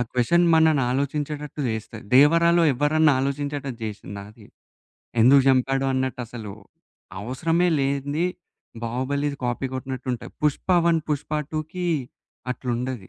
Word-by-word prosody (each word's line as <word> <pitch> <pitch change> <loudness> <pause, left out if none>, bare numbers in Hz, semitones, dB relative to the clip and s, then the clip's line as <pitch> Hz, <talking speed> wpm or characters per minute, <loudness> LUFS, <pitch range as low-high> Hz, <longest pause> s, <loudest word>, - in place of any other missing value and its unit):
ఆ - - +3
క్వెషన్ 150 +8 +3
మనల్ని 160 -4 +4
ఆలోచించేటట్టు 145 +2 -3
జేస్తది. 110 0 -5
'దేవరా' 165 +5 +6
లో - - +4
ఎవరన్నా 150 +2 +3
ఆలోచించేటట్టు 140 -2 -3
జేసిందా 100 -2 -7
అది? 110 -1 -17 0.7
ఎందుకు 135 +4 +7
జంపాడు 135 +1 +2
అన్నట్టు 130 -1 -2
అసలవసరమే 120 - -4
లేనిది 140 +4 0 0.6
'బాహుబలిది' 140 +4 -2
కాపీ 120 +2 -1
కొట్టినట్టు 130 0 -5
ఉంటయి. - - -9
'పుష్ప 150 +4 -1 0.2
1' 170 -1 +4
'పుష్ప 150 0 -2 0.2
2కి' 155 +4 -3 0.7
అట్లుండది. 125 -4 -4
135 Hz, 115 wpm, -24 LUFS, 125-150 Hz, 0.7 s, ఎందుకు